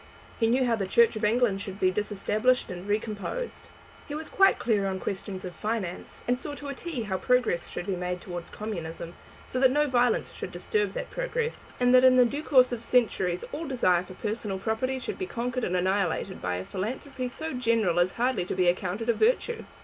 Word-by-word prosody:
He 225 - +3
knew 255 +3 +3
how 235 -2 +2
the 195 -3 -2
Church 235 +4 +4
of 215 - -5
England 215 -2 +2
should 195 0 -7
be 185 -2 +3
disestablished 210 +5 +1
and 180 +2 -7
recomposed. 215 - -3 0.4
He 290 - -5
was 310 +1 -5
quite 390 0 +5
clear 210 -4 +1
on 190 -1 -2
questions 190 0 -4
of 180 - -7
finance, 210 -5 -4
and 250 +1 +1
saw 290 +1 -5
to 285 0 -7
a - - -3
"t" 280 -4 -4
how 190 -3 -2
progress 245 -9 +2
should - - -5
be 195 -2 -1
made 180 0 -3
towards 175 -1 -7
communism, 170 -5 -6 0.3
so 255 - -3
that 260 0 +6
no 295 +3 +3
violence 245 -3 +2
should - - -6
disturb 430 -2 -1
that - - -5
progress, - - -3
and 245 0 +4
that 255 0 +7
in 260 -1 +7
the 250 -1 +7
due 280 +5 -2
course 255 -5 +5
of 235 -1 -4
centuries 190 -8 +1
all 315 +2 -4
desire 185 -10 +3
for 185 0 -11
personal 210 -1 -3
property 225 +6 -1
should 255 - -5
be 375 - -2
conquered 245 -1 -3
and 180 - 0
annihilated 190 0 0
by 90 0 -1
a 90 +1 -4
philanthropy 255 +6 -4
so 315 +5 -5
general 230 -8 +2
as 175 +1 +2
hardly 250 -3 +1
to 180 - -4
be 180 -1 +2
accounted 185 +5 0
a 235 - +4
virtue. 470 - +1
225 Hz, 210 wpm, -28 LUFS, 190-255 Hz, 0.4 s, that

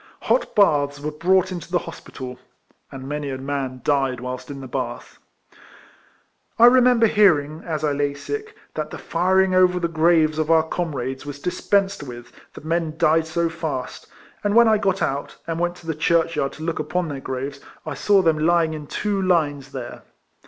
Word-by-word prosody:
Hot - - 0
baths 145 -8 +3
were 150 +1 -4
brought 185 +4 +2
into 175 -2 -7
the 180 - +3
hospital 130 -6 -9 0.2
— - - -39
and 135 -1 -8
many 145 0 -3
a 130 - -4
man 135 -1 -4
died 135 -3 +1
whilst 125 0 -6
in 140 -1 -7
the 135 - -8
bath. - - -5 1.4
I 230 - +7
remember 245 -1 +6
hearing, 160 -8 +3
as 155 -3 -3
I 150 - +2
lay 145 0 -1
sick, 430 - -6 0.2
that 155 -1 -4
the - - -7
firing 185 +2 +1
over 180 -1 +4
the 170 - 0
graves 160 -1 +2
of 155 0 -1
our 165 -1 +5
comrades 135 -7 -3
was 145 -1 -7
dispensed 195 +4 0
with, 120 -3 -9 0.2
the - - -9
men 160 0 -2
died 160 -1 +3
so 170 +1 0
fast; 160 -6 -5 0.4
and 205 0 +1
when 235 0 +7
I 215 -1 +4
got 195 -1 0
out, 140 +1 -3
and 165 0 -3
went 175 0 0
to 175 - -16
the 165 - -1
churchyard 165 -2 +1
to 155 - -9
look 165 -1 -2
upon 165 +3 -1
their 145 -3 -5
graves 135 +2 -5 0.3
I - - -4
saw 200 -2 +3
them 160 -2 +2
lying 165 0 +2
in 150 -2 -7
two 205 +3 -1
lines 145 -7 0
there. 125 -3 -7
160 Hz, 190 wpm, -22 LUFS, 145-180 Hz, 1.4 s, I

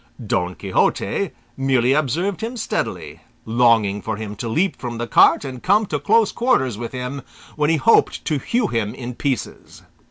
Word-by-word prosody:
Don 90 -3 -1
Quixote - - 0 0.3
merely 130 -1 +2
observed 165 - -1
him 235 +3 -4
steadily, - - -3 0.3
longing 110 -3 +2
for 110 +1 -3
him 105 -1 -6
to 115 +2 -4
leap 180 +12 +1
from 120 -2 -5
the 120 - -3
cart 130 - +4
and 130 -2 -7
come 205 +3 +3
to 150 -6 -3
close 215 +8 +3
quarters 135 - +1
with 115 +2 -6
him, 130 +2 -5 0.3
when 150 -1 +1
he 165 - +3
hoped 190 +10 +3
to 150 -4 0
hew 235 - 0
him 115 - -2
in 125 0 -6
pieces. 130 -1 -4
130 Hz, 170 wpm, -21 LUFS, 115-165 Hz, 0.3 s, cart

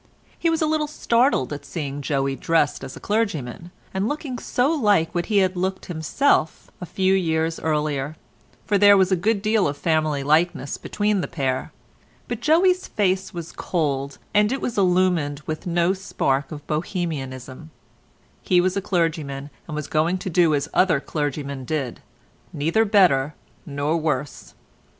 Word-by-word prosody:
He 335 - +2
was 325 -1 +1
a - - +3
little 310 -1 0
startled 240 - +1
at 145 0 -7
seeing 145 -1 -5
Joey 135 -1 -1
dressed 150 -2 +1
as 135 - -7
a - - -9
clergyman, 175 - -2 0.2
and 190 +2 0
looking 290 -4 -4
so 250 +5 +1
like 205 - +2
what 175 -1 -1
he 210 - +1
had 185 0 -3
looked 190 +1 -2
himself 160 - 0
a 180 - -5
few 190 +2 +1
years 165 -3 0
earlier, 150 -2 -1 0.5
for 205 -1 +2
there 205 0 +7
was 190 0 +3
a - - +5
good 205 +3 0
deal 215 -3 +2
of 145 0 -3
family 155 -2 0
likeness 155 0 +1
between 205 -2 0
the - - -3
pair; 135 -6 -2 0.6
but - - -4
Joey's 360 +4 +3
face 190 -2 0
was 170 -2 -7
cold 140 -5 -2 0.2
and 210 +1 +4
was 250 -3 -3
illumined 180 -6 +2
with 155 +3 -5
no 175 +1 +2
spark 145 -7 -1
of 150 -1 -8
Bohemianism; 150 -4 -4 0.7
he 180 - +3
was 185 +1 +1
a 200 - 0
clergyman 160 -7 -2 0.2
and 155 - -5
was 150 -1 -3
going 165 +5 +1
to 185 0 -5
do 165 -2 +4
as 140 0 -1
other 180 -6 +3
clergymen 140 -2 -3
did, 135 -3 -3 0.5
neither 165 +7 +1
better 170 -9 +3 0.3
nor 145 +2 -1
worse. 150 -4 -3
165 Hz, 160 wpm, -23 LUFS, 145-195 Hz, 0.7 s, there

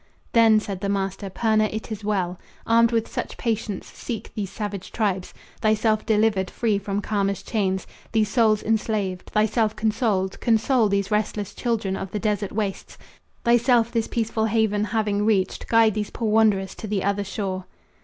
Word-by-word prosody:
"Then," 225 -2 +6
said 200 -3 -6
the 200 - -1
master, 195 0 -2
"Purna, 215 +2 +2
it 220 +1 -5
is 215 -1 -5
well. 185 -4 -1 0.3
Armed 230 +1 +4
with 230 -1 +1
such - - -5
patience, 220 -4 -2
seek 225 -3 -7
these 200 -3 -3
savage 205 -2 -5
tribes. 195 -5 -1 0.3
Thyself 215 0 +2
delivered, 210 -3 +2
free 215 -4 0
from 200 0 -2
karma's 200 -2 -1
chains 190 -4 -1 0.3
These 220 -1 +2
souls 220 -3 +3
enslaved; 210 -4 -1
thyself 215 0 +1
consoled, 215 -4 0
console 230 0 +3
These 200 0 0
restless 210 -1 -1
children 220 -6 -1
of 195 - -5
the 210 - -3
desert 205 -2 -1
wastes; 200 -2 -4 0.5
Thyself 235 0 +4
this 230 -2 0
peaceful 225 -1 -1
haven 215 -1 +1
having 210 -1 0
reached, 200 -3 0
Guide 225 -2 +4
these 210 0 -2
poor 225 -3 -2
wanderers 210 -4 +3
to 220 - -8
the 200 -2 -1
other 200 0 0
shore." 190 -2 -4
215 Hz, 165 wpm, -24 LUFS, 200-225 Hz, 0.5 s, Then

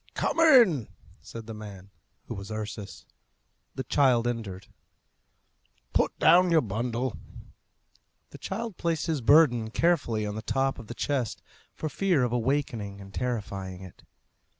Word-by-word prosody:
"Come - - -1
in!" 235 - +6 0.3
said 115 -1 -9
the 115 - -7
man, 100 -3 -10 0.3
who - - -6
was 100 +1 -8
Ursus. 105 -4 -6 0.7
The 130 - -3
child 125 -3 +3
entered. 100 -6 -4 1.3
"Put - - +1
down 180 +1 +5
your 165 -2 +4
bundle." 115 +3 -2 1.2
The - - -11
child 220 0 -5
placed 165 -2 -1
his 160 -5 -1
burden 120 -4 +5
carefully 120 -7 +1
on 105 - -3
the 110 - -5
top 135 +4 -1
of 115 - -10
the 120 - -7
chest, 130 -5 -2 0.3
for 155 - -4
fear 175 -2 +1
of 120 - 0
awakening 120 -5 -1
and 95 0 -12
terrifying 100 -6 -4
it. 95 - -13
120 Hz, 140 wpm, -27 LUFS, 105-150 Hz, 1.3 s, in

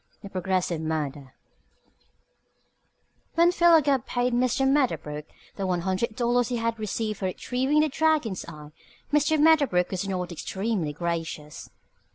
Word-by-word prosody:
THE 200 - -9
PROGRESSIVE 185 -3 -1
MURDER 150 -4 -4 2.0
When 340 +1 +5
Philo 340 -2 +5
Gubb 270 -3 0
paid 245 0 0
Mr. 255 +2 +2
Medderbrook 160 - 0 0.3
the 195 -2 -2
one 180 -2 0
hundred 190 +5 -1
dollars 245 0 +1
he 245 - -2
had 230 0 -2
received 215 0 -3
for 195 - -3
retrieving 260 +10 0
the 310 - +2
Dragon's 300 - +1
Eye, 150 -1 -10 0.4
Mr. 300 +1 +3
Medderbrook 285 - +4
was 190 +1 -3
not 180 -2 -3
extremely 190 0 -2
gracious. 165 -2 -5
215 Hz, 135 wpm, -26 LUFS, 175-265 Hz, 2.0 s, When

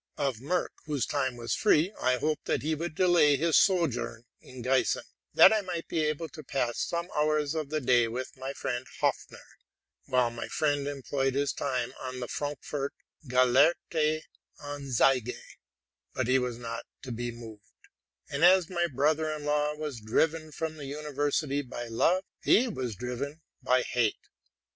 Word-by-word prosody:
Of 135 -5 0
Merck, 165 +10 -1 0.2
whose 145 -6 -1
time 130 -3 -1
was 115 0 -2
free, 185 -2 +3
I 125 0 +3
hoped 155 +3 -1
that - - 0
he 155 +2 0
would 160 +1 -4
delay 170 -5 +5
his 165 +2 +2
sojourn 120 - +2 0.2
in 125 -2 -10
Giessen, 130 +1 +2 0.3
that - - +9
I 215 - +2
might 180 -3 -5
be 165 - -2
able 155 +2 -1
to 155 - -10
pass 125 -4 -1
some 170 0 -2
hours 150 -1 +1
of 155 -3 -3
the 155 0 0
day 120 -3 +3
with 125 +3 -5
my 130 0 -6
'ood 130 -2 -3
Hopfner, - - -2 0.6
while 125 -2 +2
my 120 - -6
friend 145 -2 0
employed 135 -1 -1
his 140 0 +1
time 130 -4 -2
on 130 -1 -5
the 120 - -4
Frankfort 145 0 -4 0.2
'* - - -30
Gelehrte 150 +5 +3 0.4
Anzeige; 135 -4 +1 0.8
but 130 - 0
he 130 +1 +4
was 125 -2 -3
not 115 -1 -5 0.2
to 130 - -6
be 120 +1 -3
moved; 115 -3 -10 0.7
and 145 +2 -2
as 185 0 +6
my 175 -1 +1
brother 155 +2 +1
in 150 -1 -5
law 150 0 +1
was 150 -6 -5
driven 155 +8 0
from 160 +1 -4
the 145 - -7
university 145 0 -1
by 120 -2 -6
love, 170 +11 +2 0.2
he 250 +4 +5
was 130 - -4
driven 130 - -5 0.2
by 125 0 +3
hate. 120 -4 0
140 Hz, 165 wpm, -29 LUFS, 125-155 Hz, 0.8 s, that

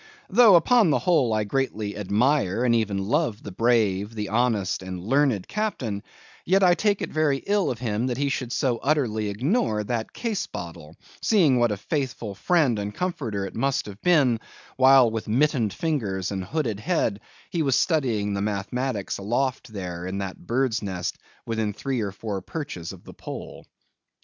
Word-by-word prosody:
Though, 220 -1 +7
upon 215 +3 +5
the 145 - +3
whole, 155 -10 +2
I 110 -1 +1
greatly 105 -3 -2
admire 110 +2 +1
and 120 - +3
even 100 -4 0
love 135 -4 0
the 100 - -7
brave, 105 -1 +1
the 105 -2 -3
honest, 110 -4 +1
and 95 -1 -6
learned 130 -5 +2
Captain; 130 - -2 0.4
yet 195 +2 +3
I 180 -1 +6
take 205 +2 +1
it - - -4
very 155 -3 +2
ill 205 -1 +2
of 125 - -2
him 115 0 -1
that 125 -2 -2
he 140 +1 0
should 130 -3 -2
so 125 -4 0
utterly 120 -8 0
ignore 120 - 0
that 115 +1 -3
case 230 -4 -3
bottle, 85 -2 -8 0.3
seeing 160 - +4
what 120 -2 +3
a 105 - -2
faithful 125 -4 -3
friend 140 - +2
and 105 +1 -4
comforter 120 - -2
it 95 - -7
must 135 +3 0
have 100 0 -10
been, 140 -10 +3 0.4
while 130 -2 +6
with 110 -1 -4
mittened 125 -2 +2
fingers 105 - -2
and 95 -2 -3
hooded 120 - -2
head 115 - 0 0.3
he 170 - 0
was 135 -4 +2
studying 115 - +1
the 100 - -1
mathematics 105 +2 -2
aloft 125 +4 -1
there 90 -3 -5
in 95 +1 -3
that 95 -2 -6
bird's 120 -3 +1
nest 90 -4 -4 0.3
within 110 -2 -1
three 130 +3 -2
or 100 -2 -2
four 100 0 -5
perches 95 - -6
of - - -12
the - - -12
pole. - - -8
115 Hz, 175 wpm, -25 LUFS, 100-145 Hz, 0.4 s, Though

